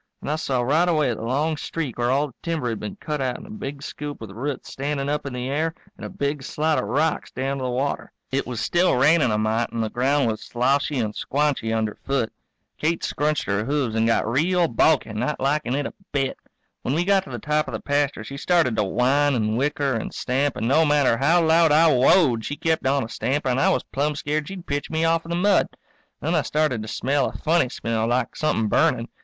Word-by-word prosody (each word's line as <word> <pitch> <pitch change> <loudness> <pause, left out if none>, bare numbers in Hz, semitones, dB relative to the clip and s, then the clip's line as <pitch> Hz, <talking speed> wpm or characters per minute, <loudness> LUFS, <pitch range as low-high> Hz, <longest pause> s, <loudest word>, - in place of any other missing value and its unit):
And - - -3
I - - +1
saw 130 -5 -1
right 160 +8 +2
away 150 -7 +2
the 110 - -7
long 145 +7 0
streak 145 -6 -4
where 120 0 +1
all 140 +3 +2
the - - -18
timber 160 -7 -2
had 115 - -3
been 200 - -6
cut 150 -7 -4
out 130 -2 -1
in - - -11
a 210 - -11
big 145 -9 -6
scoop 145 0 -6
with 110 -3 -8
roots 130 +6 -5
standing 140 0 -2
up 145 -1 -2
in 135 - -5
the 125 0 -3
air 160 +4 -1 0.2
and - - -13
a - - -5
big 140 0 -2
slide 155 +3 0
of - - -2
rocks 155 +3 0
down 135 +2 -3
to 130 - -3
the - - -1
water. 130 +3 -2 0.2
It 135 +1 -1
was 120 -3 -4
still 175 +1 +2
raining 145 +2 +4
a 105 - +1
mite 110 +2 0
and 115 - -2
the 110 - -3
ground 135 +2 +2
was 110 -1 -2
sloshy 135 +4 0
and 110 -3 -1
squanchy 140 -5 -1
under 110 -1 0
foot. 135 -5 -1 0.5
Kate 165 +2 0
scrunched 150 +1 0
her 100 +1 -1
hooves 140 -4 0
and 115 0 +2
got 115 - +2
real 170 +8 +2
balky, 125 -3 +2
not 125 +7 -2
likin' 140 -2 0
it 145 0 -1
a - - -5 0.2
bit. 135 -2 0 0.5
When 130 - -1
we 175 +2 +1
got 195 -1 +3
to - - -11
the 120 - -5
top 150 +5 0
of - - -6
the - - -3
pasture 145 0 0
she 140 - -8
started 165 -6 +2
to 105 - +3
whine 130 +8 +2
and 110 -2 0
whicker 140 +1 0
and 115 - -3
stamp, 135 +2 -1
and 110 - -1
no 150 +6 +4
matter 145 -5 +3
how 165 +6 +3
loud 160 0 +4
I 160 +1 +5
whoa 135 +3 +5
ed 110 - -8
she 145 - -3
kept 160 -2 0
on 135 0 +2
a - - -5
stamping 135 +3 -1
and 125 - +1
I - - +4
was - - +1
plumb 145 +2 -2
scared 150 +1 -2
she'd 190 -3 -8
pitch 145 0 -3
me 160 0 0
off 165 0 +1
in - - -10
the 170 - -1
mud. 195 +2 +3 0.5
Then 160 - -1
I 160 - +3
started 150 -5 0
to 110 - -7
smell 135 +5 0
a - - -12
funny 160 -4 +2
smell, 115 -2 -2
like 125 +2 0
somethin' 150 -8 0
burning. 115 +3 +2
140 Hz, 240 wpm, -23 LUFS, 125-155 Hz, 0.5 s, I